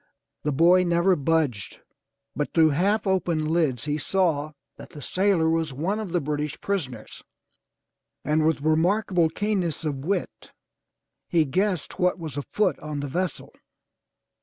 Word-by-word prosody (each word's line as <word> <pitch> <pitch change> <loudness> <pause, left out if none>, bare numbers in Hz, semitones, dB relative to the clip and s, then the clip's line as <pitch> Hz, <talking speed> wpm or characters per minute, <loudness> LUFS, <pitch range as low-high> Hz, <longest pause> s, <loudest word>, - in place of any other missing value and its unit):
The 150 - -1
boy 175 +6 +5
never 175 +2 +3
budged, 145 - -1 0.6
but 150 - -3
through 160 -2 +5
half 200 +8 +1
open 175 -5 0
lids 155 -6 0
he 150 0 -1
saw 155 -3 0 0.2
that 140 0 -11
the 150 - -11
sailor 185 +2 +1
was 160 -3 0
one 180 +11 -2
of 210 -5 -5
the 175 - +1
British 150 -1 -3
prisoners, 130 - -4 1.0
and 155 +1 +2
with 160 -2 +1
remarkable 170 +3 +2
keenness 180 -4 -2
of 145 -3 -1
wit, 165 +9 -3 0.8
he 165 -3 +2
guessed 185 +3 -1
what 180 0 +2
was 160 -6 -7
afoot 175 +4 -1
on 150 -1 -5
the 145 - -4
vessel. 180 +6 -3
160 Hz, 140 wpm, -25 LUFS, 150-185 Hz, 1.0 s, boy